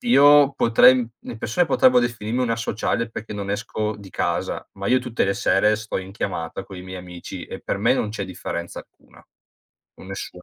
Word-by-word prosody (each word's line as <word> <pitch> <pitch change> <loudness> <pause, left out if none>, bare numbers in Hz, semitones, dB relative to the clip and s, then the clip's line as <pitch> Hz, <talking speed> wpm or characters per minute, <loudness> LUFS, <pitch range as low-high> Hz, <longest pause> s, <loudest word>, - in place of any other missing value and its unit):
io 145 - +6
potrei 120 -1 +6
im 120 -2 -2
le - - -8
persone 120 +11 +1
potrebbero 125 -5 +5
definirmi 120 0 -1
un 120 - 0
asociale 115 0 -1
perché 110 -1 -7
non 100 -1 -5
esco 105 0 -2
di 100 -2 -12
casa, - - -2
ma 100 0 -6
io 130 - +4
tutte 125 -4 -1
le 100 - +1
sere 105 +3 +3
sto 110 0 -5
in 95 +1 -8
chiamata 90 -2 -4
coi 95 -2 -10
miei 95 0 -7
amici 90 -1 -8
e - - -8
per - - -3
me - - +3
non 105 - -1
c'è 105 -2 -4
differenza 85 -1 -6
alcuna. - - -21 0.8
Nessuna. 95 -1 -8
105 Hz, 190 wpm, -23 LUFS, 95-120 Hz, 0.8 s, io